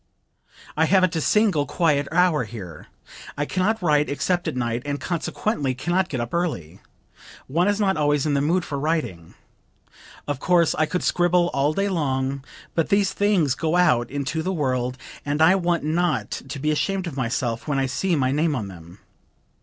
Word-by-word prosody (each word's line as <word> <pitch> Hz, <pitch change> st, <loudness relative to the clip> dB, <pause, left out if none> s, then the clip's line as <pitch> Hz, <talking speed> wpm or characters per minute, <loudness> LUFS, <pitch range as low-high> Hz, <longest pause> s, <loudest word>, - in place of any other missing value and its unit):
"I 160 Hz, -, +3 dB
haven't 185 Hz, -1 st, +3 dB
a 160 Hz, -, 0 dB
single 195 Hz, -7 st, +2 dB
quiet 150 Hz, -5 st, +1 dB
hour 170 Hz, -6 st, +3 dB
here. 95 Hz, -8 st, -9 dB, 0.5 s
I 145 Hz, -, 0 dB
can 185 Hz, -, -2 dB
not 220 Hz, +1 st, 0 dB
write 150 Hz, -3 st, +2 dB
except 175 Hz, +5 st, -1 dB
at -, -, -2 dB
night 120 Hz, -1 st, -1 dB
and 145 Hz, 0 st, -3 dB
consequently 165 Hz, -, -2 dB
can 170 Hz, +7 st, -3 dB
not 185 Hz, 0 st, +1 dB
get 130 Hz, -, -3 dB
up 120 Hz, 0 st, -4 dB
early. 160 Hz, -, -2 dB, 0.7 s
One 170 Hz, +7 st, +1 dB
is 205 Hz, 0 st, +1 dB
not 195 Hz, -4 st, +1 dB
always 145 Hz, -1 st, +1 dB
in 150 Hz, -, +1 dB
the 140 Hz, -, +2 dB
mood 170 Hz, +4 st, +1 dB
for 140 Hz, -, -4 dB
writing. 140 Hz, -, -3 dB, 0.9 s
Of 145 Hz, -2 st, -2 dB
course 175 Hz, -1 st, +3 dB
I 155 Hz, -, +1 dB
could 180 Hz, -, -2 dB
scribble 175 Hz, 0 st, +2 dB
all 140 Hz, +2 st, +1 dB
day 195 Hz, +4 st, 0 dB
long, 135 Hz, -6 st, -1 dB, 0.3 s
but 165 Hz, -, 0 dB
these 200 Hz, -1 st, +2 dB
things 195 Hz, -9 st, +2 dB
go 160 Hz, +3 st, -1 dB
out 125 Hz, -10 st, +3 dB
into 145 Hz, +3 st, -3 dB
the 185 Hz, +4 st, -2 dB
world 130 Hz, -6 st, -1 dB, 0.3 s
and 145 Hz, +1 st, -2 dB
I 160 Hz, +3 st, +6 dB
want 175 Hz, -4 st, 0 dB
not 170 Hz, +4 st, 0 dB
to 145 Hz, -, -6 dB
be 150 Hz, +3 st, 0 dB
ashamed 190 Hz, +5 st, -1 dB
of 165 Hz, -6 st, -6 dB
myself 120 Hz, -1 st, -2 dB
when 145 Hz, -2 st, 0 dB
I 135 Hz, -, +1 dB
see 170 Hz, +7 st, 0 dB
my 130 Hz, -3 st, +1 dB
name 150 Hz, +2 st, +1 dB
on 105 Hz, -6 st, -4 dB
them. 85 Hz, 0 st, -13 dB
155 Hz, 190 wpm, -23 LUFS, 135-175 Hz, 0.9 s, I